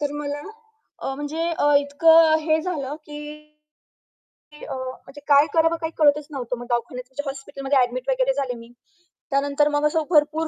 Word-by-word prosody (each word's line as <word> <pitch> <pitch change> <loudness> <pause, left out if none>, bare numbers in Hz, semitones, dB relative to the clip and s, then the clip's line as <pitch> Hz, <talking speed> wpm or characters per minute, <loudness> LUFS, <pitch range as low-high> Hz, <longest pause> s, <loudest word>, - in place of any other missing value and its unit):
तर 290 -1 -2
मला 290 0 -4 0.6
अ, 270 - -3
म्हणजे 310 +4 -3
अ, 290 - +3
इतकं 320 +3 +5
हे 315 0 +1
झालं 300 -5 -4
की 295 -1 -9 1.3
की 300 - -12
अ, - - -6
म्हणजे 260 +2 -8
काय 285 +1 +6
करावं 325 0 +3
काही 320 0 -3
कळतच 295 -1 +3
नव्हतं. 250 -3 -4
मग 245 - -8
दवाखान्यात 240 +1 -3
म्हणजे 275 +2 -5
हॉस्पिटलमध्ये 270 0 -3
ॲडमिट 250 +1 -1
वगैरे 265 0 +2
झाले 265 -3 -2
मी. 230 0 -13 0.6
त्यानंतर 280 +1 +2
मग 295 0 0
असं 315 +1 0
भरपूर 310 0 +2
285 Hz, 165 wpm, -23 LUFS, 270-305 Hz, 1.3 s, काय